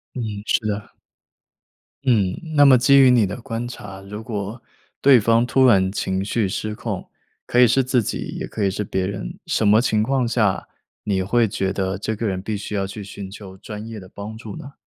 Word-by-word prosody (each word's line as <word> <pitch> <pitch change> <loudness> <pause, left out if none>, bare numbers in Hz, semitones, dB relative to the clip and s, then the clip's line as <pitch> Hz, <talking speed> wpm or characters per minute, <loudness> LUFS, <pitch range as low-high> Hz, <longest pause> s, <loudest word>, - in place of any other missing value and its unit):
嗯， 125 - -3 0.2
是 - - +2
的。 105 -1 -3 1.2
嗯， 105 -8 +3 0.2
那 145 -1 +6
么 135 -2 +7
基 140 +3 +5
于 130 -1 +7
你 120 -4 +4
的 95 - -6
观 115 -1 -4
察， 105 -5 -9
如 105 +3 -8
果 110 +1 -5 0.4
对 135 -2 +7
方 115 +2 +3
突 130 +1 +3
然 95 -6 +4
情 95 -1 -2
绪 105 -1 0
失 110 +3 -3
控， - - -5 0.4
可 120 - -1
以 125 - +8
是 130 +4 +3
自 130 -1 +2
己 - - -4
也 - - -4
可 105 - -3
以 95 - +2
是 105 +2 -3
别 95 0 -2
人， 95 -11 -5
什 110 - +1
么 105 +2 +6
情 110 -3 +1
况 130 +3 +1
下 110 -5 0 0.3
你 95 -3 0
会 115 +3 +2
觉 95 -3 -1
得 95 0 -2
这 110 +2 -2
个 110 +1 -2
人 95 -1 -2
必 105 +2 -3
须 105 +1 -6
要 95 -1 0
去 105 +2 -7
寻 100 0 -8
求 95 -1 -11
专 105 +2 -8
业 115 -1 -7
的 95 -1 -11
帮 105 +2 -8
助 110 -2 -8
呢？ 140 +1 -10
105 Hz, 230 characters per minute, -22 LUFS, 100-120 Hz, 1.2 s, 以